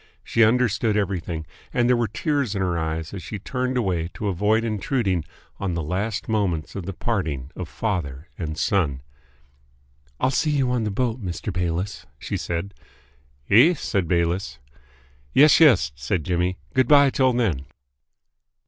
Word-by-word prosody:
She 115 - +3
understood 110 -2 +2
everything, 90 -5 -2 0.3
and 120 -1 +2
there 125 - +4
were 120 -1 +1
tears 140 - -1
in 100 - -1
her 90 -2 0
eyes 80 0 -3
as 95 - -5
she 95 +5 -6
turned 125 +5 -2
away 90 -8 0
to 105 - -2
avoid 105 +5 +2
intruding 105 - 0 0.4
on 95 -3 -2
the 85 - -2
last 100 +7 -2
moments 95 -8 -1
of 95 -3 -5
the 95 - -3
parting 80 - -2
of 90 -4 -6
father 85 -9 -3
and 80 -3 -5
son. 80 - 0 1.2
"I'll 130 - +2
see 135 +4 +1
you 135 -4 +1
on 120 -3 0
the - - 0
boat, 115 +2 -2
Mr. 90 +2 -4
Bayliss," 90 +2 -2
she - - -4
said. 85 +4 -3 0.8
"Eh?" 130 - +7
said 95 - -1
Bayliss. 85 -4 0 0.8
"Yes, 150 +2 +7
yes," 120 - +5
said 70 +6 -2
Jimmy. 90 +2 0 0.2
"Good 130 -2 +3
bye 140 -1 +6
till 130 -1 +3
then." 95 - 0
100 Hz, 155 wpm, -23 LUFS, 85-120 Hz, 1.2 s, Eh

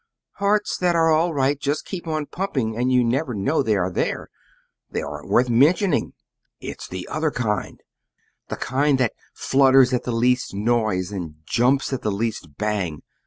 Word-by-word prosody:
"Hearts 205 +1 +1
that 180 -1 +1
are 165 -1 +4
all 165 +2 +3
right 140 -1 +1
just 145 +1 -2
keep 175 -3 -6
on 155 -2 -1
pumping, 140 - -2
and 125 +2 0
you 125 -1 +4
never 125 +1 -1
know 140 +11 +1
they 110 -5 +1
are 95 0 0
there. - - -2 0.6
They - - -3
aren't - - -7
worth 125 +1 +3
mentioning. 150 - +3 0.5
It's - - -7
the 90 -1 -6
other 155 0 -1
kind 110 -7 -2 0.7
the - - -4
kind 140 +2 +1
that 125 -4 +1 0.2
flutters 135 -1 +4
at 125 - +1
the 125 - -4
least 125 -1 +1
noise 105 -4 0
and 85 -6 -5
jumps 130 - +1
at 130 - -2
the 105 - -1
least 100 -8 -4
bang! 100 -7 -2
125 Hz, 170 wpm, -23 LUFS, 110-150 Hz, 0.7 s, are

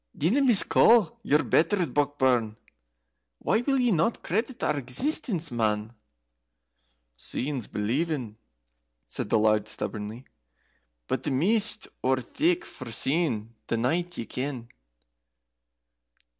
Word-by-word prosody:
"Dinna 195 - +2
miscall 230 - +5
your 150 +1 +2
betters, 175 +2 +1
Brockburn: 130 -6 +1 0.8
why 220 - 0
will 270 +2 0
ye 245 -2 +2
not 175 +5 0
credit 230 +7 -2
our 150 - +1
existence, 165 - +1
man?" 110 -1 -1 1.2
"Seein's 130 - -4
believin'," 125 +1 -2 0.7
said - - -5
the - - +3
Laird, 110 -1 +2
stubbornly; 110 +2 -5 0.8
"but - - -2
the - - -2
mist's 200 - +2 0.2
ower 130 0 +2
thick 335 - -1
for 130 - -9
seein' 120 -4 -1
the 115 - -1
night, 170 +9 -1
ye 115 - -4
ken." 125 0 -5
145 Hz, 110 wpm, -26 LUFS, 115-190 Hz, 1.2 s, miscall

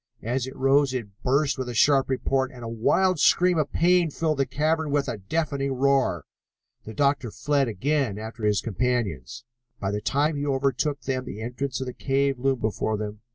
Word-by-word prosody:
As 125 +3 -1
it 130 - -8
rose 135 0 +3
it 115 -5 -4
burst 140 +2 +1
with 130 -1 -3
a 120 - -5
sharp 135 +3 +4
report, 130 0 0
and 125 -2 -11
a - - -5
wild 160 +11 +1
scream 180 +1 +4
of 150 - -1
pain 175 0 +3
filled 155 -1 -1
the 135 - +2
cavern 155 +3 0
with 145 -1 0
a 115 -4 -4
deafening 140 - -2
roar. 135 +1 +1 0.6
The 110 - -8
doctor 140 -3 +1
fled 140 +4 0
again 125 0 -1
after 110 +1 -8
his 105 -2 +2
companions. 115 - -2 0.4
By 95 - -2
the 105 0 -2
time 145 +5 +1
he 145 - -2
overtook 140 +1 0
them 130 -1 -3
the 105 - -7
entrance 125 +2 -3
of - - -2
the 125 - -5
cave 135 0 0
loomed 135 -1 0
before 110 0 -1
them. 105 0 -6
135 Hz, 195 wpm, -25 LUFS, 115-145 Hz, 0.6 s, sharp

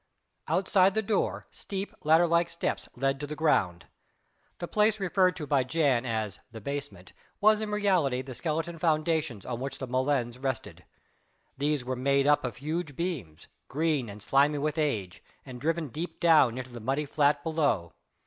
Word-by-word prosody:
Outside 190 0 +3
the 220 - +1
door, 205 0 -1
steep, 195 0 -5
ladder 160 +3 +5
like 170 0 +2
steps 170 - -3
led 135 +2 0
to 145 - -5
the 150 - -5
ground. 90 - +1 0.7
The 175 - -5
place 215 +2 +2
referred 185 -1 +2
to 155 - -5
by 140 -2 +2
Jan 130 -3 +1
as 110 -4 -2
"the 110 - -8
basement" 140 -7 -6 0.3
was 215 +1 +4
in 215 - -3
reality 185 -11 +1
the 130 0 -8
skeleton 165 +5 -3
foundations 155 - 0
on 120 -2 -4
which 135 +2 -4
the 130 - -5
molens 130 -1 -1
rested. 130 -3 -4 0.7
These 145 -2 -1
were 130 +1 -2
made 140 +2 +2
up 145 0 +4
of 125 -4 -3
huge 155 0 -4
beams 145 - -4 0.2
green 150 -5 0
and 100 0 -9
slimy 145 +2 +3
with 150 +2 -1
age, 105 -12 -2 0.2
and 125 -3 -9
driven 165 0 -1
deep 160 +5 -6
down 150 -8 +5
into 130 0 -6
the 120 - -8
muddy 135 +6 -1
flat 145 0 +2
below. 145 - 0
145 Hz, 170 wpm, -28 LUFS, 125-165 Hz, 0.7 s, ladder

